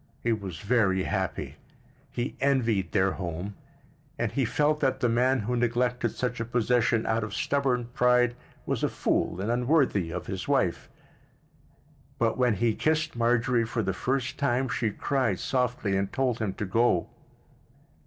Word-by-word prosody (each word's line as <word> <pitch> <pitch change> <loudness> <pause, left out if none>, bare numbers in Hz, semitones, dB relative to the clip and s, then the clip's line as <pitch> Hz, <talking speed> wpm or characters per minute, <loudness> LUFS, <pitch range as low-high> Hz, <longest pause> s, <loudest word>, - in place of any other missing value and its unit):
He 115 - +1
was 95 -5 -5
very 100 -4 +2
happy. 95 -1 -3 0.5
He 120 +2 -3
envied 115 -9 +1
their 95 -1 +2
home, 90 +2 -5 0.6
and - - -1
he 135 -3 0
felt 150 +5 +1
that 130 -2 +1
the 125 - +2
man 125 +2 +2
who 120 +4 -2
neglected 120 +1 +1
such 125 -1 -3
a 115 - -2
possession 120 -1 +1
out 110 0 0
of 105 -2 -5
stubborn 135 -4 0
pride 125 -1 +3 0.3
was - - -2
a - - +2
fool - - -1
and 105 +4 -1
unworthy 125 - +2
of - - -5
his - - -5
wife. - - 0 1.3
But - - +1
when 125 -3 +2
he 115 +2 +1
kissed 155 +3 0
Marjorie 120 +1 +2
for 115 0 -2
the 95 0 -1
first 130 +5 -2
time 130 -2 +1
she 120 -5 0
cried 135 +5 0
softly 125 -6 0
and 95 0 -1
told 130 -3 0
him 105 -4 -2
to 105 - -3
go. 100 -2 +2
120 Hz, 160 wpm, -27 LUFS, 105-125 Hz, 1.3 s, pride